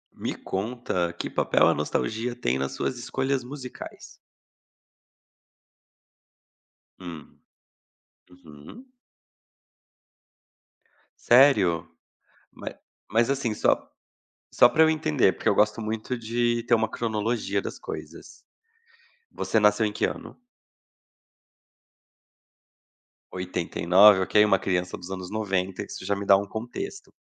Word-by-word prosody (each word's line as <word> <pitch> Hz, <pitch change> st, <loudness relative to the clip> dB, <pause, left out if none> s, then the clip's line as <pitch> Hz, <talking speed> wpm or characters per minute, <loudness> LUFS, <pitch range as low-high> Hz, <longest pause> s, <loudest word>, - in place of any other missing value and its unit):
Me -, -, -4 dB
conta, 95 Hz, -4 st, -3 dB
que 85 Hz, -, -5 dB
papel -, -, +2 dB
a -, -, +4 dB
nostalgia 115 Hz, -, -2 dB
tem 65 Hz, -, -1 dB
nas 70 Hz, 0 st, -3 dB
suas 125 Hz, -, -3 dB
escolhas 130 Hz, +1 st, -2 dB
musicais? 130 Hz, -1 st, -9 dB, 2.9 s
Hum. 85 Hz, -5 st, -11 dB, 1.1 s
Uhum. 80 Hz, -, -14 dB, 2.3 s
Sério? 105 Hz, -, +5 dB, 0.7 s
Mai -, -, -7 dB, 0.4 s
mas 115 Hz, +3 st, +2 dB
assim 135 Hz, -4 st, -1 dB
só 105 Hz, -, 0 dB, 0.6 s
só 120 Hz, -, +6 dB
para 160 Hz, -, +2 dB
eu 160 Hz, -, +4 dB
entender, 155 Hz, -, +2 dB
porque -, -, -1 dB
eu -, -, +3 dB
gosto 105 Hz, +2 st, +2 dB
muito 110 Hz, +3 st, -3 dB
de 120 Hz, +1 st, -1 dB
ter -, -, 0 dB
uma 110 Hz, -1 st, +2 dB
cronologia 110 Hz, -3 st, -2 dB
das -, -, -7 dB
coisas. -, -, -9 dB, 1.0 s
Você 110 Hz, -, 0 dB
nasceu 105 Hz, +1 st, +3 dB
em 105 Hz, -, -1 dB
que -, -, 0 dB
ano? -, -, -7 dB, 2.9 s
89, 90 Hz, +2 st, +4 dB
ok, 105 Hz, +3 st, +4 dB
uma 95 Hz, -2 st, +3 dB
criança 90 Hz, -1 st, -2 dB
dos 90 Hz, -, -10 dB
anos 95 Hz, -1 st, -6 dB
90, 95 Hz, -3 st, -2 dB
isso -, -, -9 dB
já 100 Hz, +1 st, 0 dB
me 100 Hz, 0 st, -5 dB
dá 100 Hz, -, +7 dB
um 100 Hz, +1 st, -4 dB
contexto. 390 Hz, -, -7 dB
110 Hz, 110 wpm, -25 LUFS, 95-120 Hz, 2.9 s, dá